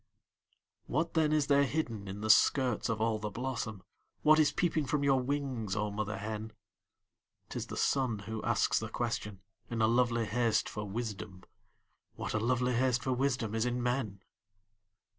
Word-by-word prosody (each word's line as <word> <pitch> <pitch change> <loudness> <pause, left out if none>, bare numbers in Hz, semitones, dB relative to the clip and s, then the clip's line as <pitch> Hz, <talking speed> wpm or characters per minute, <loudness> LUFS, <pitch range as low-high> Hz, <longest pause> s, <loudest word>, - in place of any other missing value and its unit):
What 160 +4 -1
then 155 -2 +3
is 155 -2 +3
there 140 0 +4
hidden 120 -8 -2
in 100 +2 -6
the 110 - -3
skirts 125 -1 +3
of 110 -1 -1
all 110 -1 +1
the 105 0 -3
blossom, 115 -3 -4 0.4
What 155 +1 +6
is 155 - +4
peeping 160 -5 0
from 145 +2 0
your 135 -2 +4
wings, 130 -7 -2
oh 105 -1 -1
mother 105 +1 -3
hen? 110 +1 -5 1.0
'T - - -5
is - - -4
the - - -6
sun 130 -5 +1
who 110 +2 -5
asks - - +2
the - - -5
question, 100 -3 -3 0.3
in 115 - -3
a 110 - +4
lovely 120 0 +2
haste 115 0 +1
for 105 -1 -5
wisdom 105 -3 -5 0.7
What - - -4
a 110 - +1
lovely 125 +2 +1
haste 125 0 +2
for 130 - 0
wisdom 125 -4 0
is 110 0 +1
in 120 0 -1
men? 120 -6 -2
120 Hz, 175 wpm, -32 LUFS, 110-135 Hz, 1.0 s, What